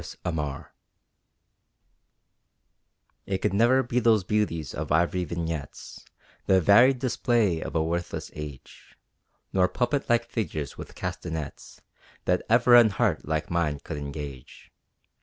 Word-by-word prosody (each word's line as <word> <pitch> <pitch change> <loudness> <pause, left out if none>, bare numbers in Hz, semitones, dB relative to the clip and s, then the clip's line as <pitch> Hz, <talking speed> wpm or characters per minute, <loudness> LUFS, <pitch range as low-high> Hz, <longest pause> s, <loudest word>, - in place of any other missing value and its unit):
The - - -10
Ideal 75 -4 -4 2.6
It 95 - 0
could 95 - -1
ne'er 120 +6 +4
be 120 0 0
those 110 -4 +3
beauties 90 -7 -1
of 75 0 -5
ivory 85 +3 +2
vignettes; 80 -3 -6 0.4
The 95 - +5
varied 120 +9 +6
display 115 -8 +1
of - - -6
a 80 - +2
worthless 85 +2 -3
age, 75 -3 -10 0.6
Nor 90 -1 +4
puppet 125 +9 -1
like 120 0 +3
figures 90 - -4
with - - -10
castonets, 80 -4 -6 0.4
That 90 0 +2
ever 120 +2 +5
an 120 -2 +8
heart 100 -7 0
like 80 +1 -2
mine 80 -4 0
could 75 - -6
engage. 70 -3 -8
90 Hz, 125 wpm, -26 LUFS, 80-115 Hz, 2.6 s, an